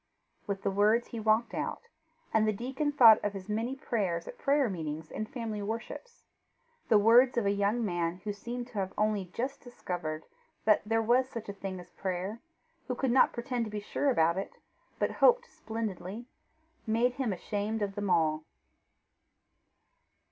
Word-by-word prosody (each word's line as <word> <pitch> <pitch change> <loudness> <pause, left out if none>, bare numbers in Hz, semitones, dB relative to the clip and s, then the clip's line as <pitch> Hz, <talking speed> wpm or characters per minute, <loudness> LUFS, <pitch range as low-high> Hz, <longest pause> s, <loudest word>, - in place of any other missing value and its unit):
With 200 -1 -3
the - - +1
words 210 +4 +3
he 230 - -5
walked 220 +2 +2
out, - - -3 0.5
and 220 0 +4
the - - +4
deacon 265 +7 -2
thought 235 -6 +7
of 205 -1 -1
his 195 -1 -7
many 225 +5 -2
prayers 195 -10 -2
at - - -9
prayer 280 -1 +3
meetings 160 -5 -5
and 215 0 -4
family 225 -4 -4
worships. 230 - -6 0.7
The 220 - +7
words 240 +4 +6
of 235 - +2
a 200 - +3
young 205 +4 +1
man 175 -1 -2
who 205 -1 -2
seemed 240 +4 -5
to 220 -5 -4
have 190 -1 -2
only 210 -2 +1
just 250 +9 -4
discovered 175 - -5 0.4
that 215 -1 +5
there 225 0 +2
was 250 +3 +3
such 225 -4 -7
a - - -3
thing 195 -2 -6
as 175 0 -13
prayer, 190 +4 -3 0.5
who 250 - -2
could 260 0 0
not 260 - +5
pretend 240 -1 -2
to - - -6
be 210 0 -4
sure 275 +7 -1
about 170 -6 +3
it, 195 - -6 0.4
but - - 0
hoped - - +4
splendidly, 220 - -5 0.6
made 235 +3 +2
him 245 -5 0
ashamed 205 +3 -2
of 200 -1 -2
them 205 -1 -3
all. 155 -2 +2
215 Hz, 175 wpm, -30 LUFS, 195-240 Hz, 0.7 s, thought